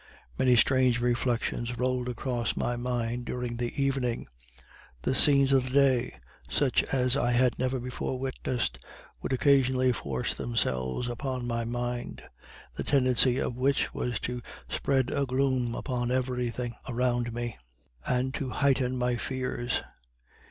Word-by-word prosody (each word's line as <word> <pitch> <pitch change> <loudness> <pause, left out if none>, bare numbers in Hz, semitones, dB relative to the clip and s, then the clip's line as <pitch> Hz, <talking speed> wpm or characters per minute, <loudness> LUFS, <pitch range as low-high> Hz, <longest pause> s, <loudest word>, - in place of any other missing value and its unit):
Many 125 -1 +4
strange 130 0 +4
reflections 120 0 0
rolled 125 0 0
across 120 -2 -2
my 120 - 0
mind 120 0 -2
during 120 -1 -3
the 120 0 -2
evening. 135 -3 0 0.8
The - - +1
scenes 140 0 +5
of 130 -1 +4
the 130 - -5
day 130 -3 +3 0.3
such 140 -3 +2
as 125 -1 +2
I 120 -3 +1
had 125 +1 +2
never 130 0 0
before 125 +1 -3
witnessed 125 - -2 0.4
would - - -4
occasionally 130 -1 +3
force 70 - -2
themselves 65 - -1
upon 125 +1 -3
my 115 -1 -1
mind, 120 +1 -4 0.5
the - - -4
tendency 130 -2 +3
of 125 - -1
which 135 +2 +1
was 120 -3 -2
to 125 0 -3 0.3
spread 130 -3 0
a 140 -1 0
gloom 130 -2 +1
upon 120 -3 -2
every 125 -1 0
thing 120 0 -4 0.2
around 120 -1 0
me, 120 - -4 0.4
and 130 - 0
to 140 -2 -3
heighten 130 -2 +1
my 125 -1 0
fears. 125 -1 -2
125 Hz, 140 wpm, -28 LUFS, 120-130 Hz, 0.8 s, scenes